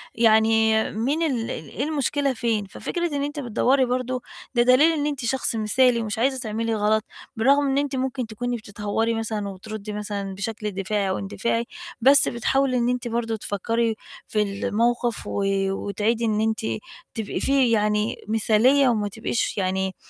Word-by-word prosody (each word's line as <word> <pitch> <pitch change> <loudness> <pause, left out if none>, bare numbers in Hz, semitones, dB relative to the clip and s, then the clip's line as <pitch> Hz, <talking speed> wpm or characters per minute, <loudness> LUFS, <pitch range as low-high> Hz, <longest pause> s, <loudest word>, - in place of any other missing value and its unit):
يعني 220 -1 +4
مين 270 +10 0
ال 250 -8 -1
إيه 160 - -5
المشكلة 285 -2 0
فين؟ 225 -3 -1
ففكرة 345 - -3
إن 280 - -1
أنتِ 290 +1 -4
بتدوّري 260 +1 +2
برضه 255 0 -2 0.3
ده 240 - +5
دليل 255 +6 +5
إن 295 -2 -1
أنتِ 285 -4 -2
شخص 255 -1 0
مثالي 235 +3 +3
ومش 215 -1 -3
عايزة 265 +2 +1
تعملي 225 -1 -2
غلط، 215 0 +2 0.3
بالرغم 280 +5 +3
إن 270 0 +1
أنتِ 285 -1 0
ممكن 260 -1 -2
تكوني 245 +3 -3
بتتهوّري 215 +1 -2
مثلًا، 220 -2 -3
وبتردّي 210 +2 -7
مثلًا 205 -2 -4
بشكل 210 +2 -4
دفاعي 195 +1 -1
أو 190 - -1
اندفاعي، 230 +4 -2 0.4
بس 275 +4 +7
بتحاولي 255 +2 +1
إن 240 0 +1
أنتِ 250 0 -2
برضه 230 -1 -1
تفكّري 225 +2 -1 0.3
في 215 - 0
الموقف، 230 +3 0
و 200 - -2 0.3
وتعيدي 210 +4 -1
إن 215 -1 +1
أنتِ 220 +1 0 0.5
تبقي 220 -3 -3
فيه 270 -4 +3
يعني 210 0 +1
مثالية 225 +5 +4
وما 215 -3 0
تبقيش 225 +2 -2
يعني، 190 0 -1
225 Hz, 160 wpm, -24 LUFS, 210-255 Hz, 0.5 s, بس